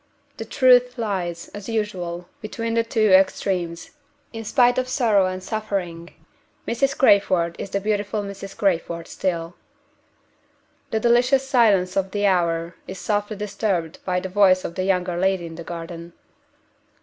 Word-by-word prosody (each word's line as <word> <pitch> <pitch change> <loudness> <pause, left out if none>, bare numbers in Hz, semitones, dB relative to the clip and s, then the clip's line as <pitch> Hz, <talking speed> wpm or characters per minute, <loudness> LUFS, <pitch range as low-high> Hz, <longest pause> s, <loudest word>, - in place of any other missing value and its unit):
The 225 - -5
truth 250 +1 +4
lies, 185 -7 -3
as 205 +1 -9
usual, 180 -6 -3
between 230 +1 -4
the 230 - +3
two 220 -2 +1
extremes. 185 -2 +1 0.4
In 225 0 -6
spite 245 +2 +3
of 255 - -2
sorrow 225 -7 +2
and 185 0 -5
suffering, 185 -6 -4 0.6
Mrs. 275 +3 0
Crayford 185 -8 +3
is - - -5
the 200 - -1
beautiful 205 0 -1
Mrs. 195 0 -8
Crayford 170 -3 -1
still. 170 -2 -3 1.4
The 220 - 0
delicious 250 +4 +3
silence 205 -8 +3
of 195 -1 0
the 205 +1 -1
hour 170 -3 +1
is 190 - -7
softly 205 +3 -2
disturbed 195 -5 -2
by 180 -1 0
the 190 - -5
voice 185 -1 +3
of - - -4
the 185 - -2
younger 180 -2 0
lady 190 -1 +1
in 165 - -8
the 170 +1 -8
garden. 170 0 -8
195 Hz, 150 wpm, -23 LUFS, 175-220 Hz, 1.4 s, truth